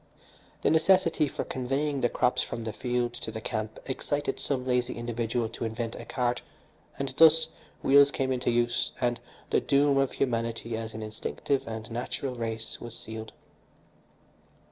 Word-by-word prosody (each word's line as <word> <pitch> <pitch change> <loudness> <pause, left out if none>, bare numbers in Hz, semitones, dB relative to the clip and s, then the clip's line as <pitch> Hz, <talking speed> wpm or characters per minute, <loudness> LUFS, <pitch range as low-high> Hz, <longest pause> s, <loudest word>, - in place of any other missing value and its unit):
The - - +4
necessity 160 -1 +4
for - - -3
conveying 135 +2 -1
the 120 - +3
crops 125 - +2
from 115 - -4
the 110 -1 -4
field 120 -1 -1
to 120 -2 -5
the 110 0 -5
camp 110 0 -3
excited 145 +2 -2
some 130 -3 -1
lazy 125 -1 +1
individual 120 0 -1
to 115 - -6
invent 115 0 -2
a - - -8
cart, 120 -1 0 0.6
and, 140 -1 -2
thus, 160 0 +7 0.3
wheels 140 +1 +7
came 135 -1 -1
into 125 -1 0
use 120 0 +1
and 120 -2 +1 0.3
the - - +4
doom 140 0 +3
of 135 -1 +1
humanity 115 -2 -1
as 110 0 -5
an 110 - -5
instinctive 110 +5 -2
and 110 0 -6
natural 125 +3 -3
race 115 -2 -4
was 120 -1 -7
sealed. 110 0 -7
120 Hz, 160 wpm, -28 LUFS, 115-135 Hz, 0.6 s, thus